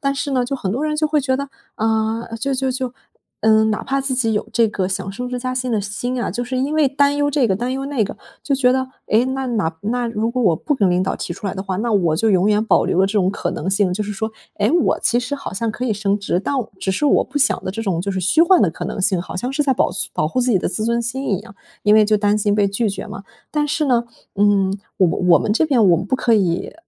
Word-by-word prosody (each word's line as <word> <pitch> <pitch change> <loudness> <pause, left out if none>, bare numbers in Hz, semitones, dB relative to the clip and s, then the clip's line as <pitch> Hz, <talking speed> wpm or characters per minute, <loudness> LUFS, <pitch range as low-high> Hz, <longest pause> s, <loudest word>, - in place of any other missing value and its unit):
但 275 -1 0
是 280 0 -3
呢， 255 -2 +1
就 270 +3 -3
很 190 -5 -3
多 275 +6 -2
人 305 0 -1
会 300 -1 +2
觉 260 -1 0
得， 280 0 -4 0.3
啊， 220 +1 0
就 275 - -1
就 265 0 -1
就 255 -1 -3 0.5
嗯 220 0 +4
哪 210 - -2
怕 275 +1 0
自 265 -1 -1
己 240 -3 +1
有 210 - -1
这 230 -1 +3
个 190 -3 -2
想 195 0 -3
升 245 +6 -5
职 250 - -3
加 255 +1 -3
薪 255 -1 -2
的 215 - +1
心 245 +5 -3
啊， - - -2
就 245 - -3
是 255 +2 -4
因 280 +4 -1
为 310 -2 +4
担 285 +1 +2
忧 290 0 +1
这 275 -4 +2
个 190 - +2
担 245 +3 -2
忧 270 +1 -3
那 280 -5 0
个， - - -7 0.3
就 280 - 0
觉 250 -2 +3
得， 260 0 0 0.2
诶， 225 +3 +3
那 265 0 -2
那 210 -9 -1
那 240 +3 -1
如 225 0 -1
果 250 0 -1
我 175 -6 +4
不 295 - -1
跟 200 -7 +2
领 180 - +2
导 190 - -1
提 - - -4
出 200 - -7
来 195 - -2
的 190 - -4
话， 190 -2 -3
那 230 +4 -1
我 175 -6 +2
就 225 +5 +2
永 190 +2 +3
远 210 +1 +2
保 - - +3
留 185 - +1
了 190 - +4
这 195 - -4
种 190 -3 +2
可 - - -3
能 185 - -3
性。 195 -2 +2
就 210 - -2
是 210 - -4
说， 220 +3 -3 0.3
诶， 205 +1 +2
我 345 - +2
其 240 - +2
实 270 +3 -3
好 275 - -7
像 225 +3 -1
可 245 +4 -5
以 220 - +1
升 205 0 0
职， 200 -3 -1
但 280 - -2 0.3
只 190 - -1
是 295 +10 0
我 - - +4
不 290 - -3
想 280 - +2
的 - - -2
这 225 +4 -5
种 185 -6 -1
就 200 +3 -3
是 190 - -2
虚 310 - +3
幻 360 +1 +5
的 185 - +4
可 - - -7
能 - - -4
性。 185 -2 +2
好 - - -9
像 245 +7 -2
是 295 +2 +1
在 270 -2 +2
保 - - +1
存 210 - -2
保 - - 0
护 255 - -1
自 250 - +1
己 200 - +3
的 - - -2
自 205 +4 -2
尊 235 +1 +1
心 250 +2 -3
一 190 - +1
样， 210 0 -13 0.3
因 210 - +5
为 215 -1 +6
就 215 0 +3
担 205 0 +2
心 205 -1 +1
被 205 -1 +3
拒 205 +1 0
绝 195 - -6
嘛。 - - -8 0.3
但 300 -1 +1
是 300 +1 0
呢， 240 -2 +2 0.3
嗯 200 -1 +2 0.2
我 185 - +5
我 175 0 +3
们 210 - 0
这 235 - +2
边 250 -10 +3
我 170 - +5
们 180 - -3
不 235 - 0
可 235 -3 +2
以， 180 -4 0
225 Hz, 320 characters per minute, -20 LUFS, 200-260 Hz, 0.5 s, 为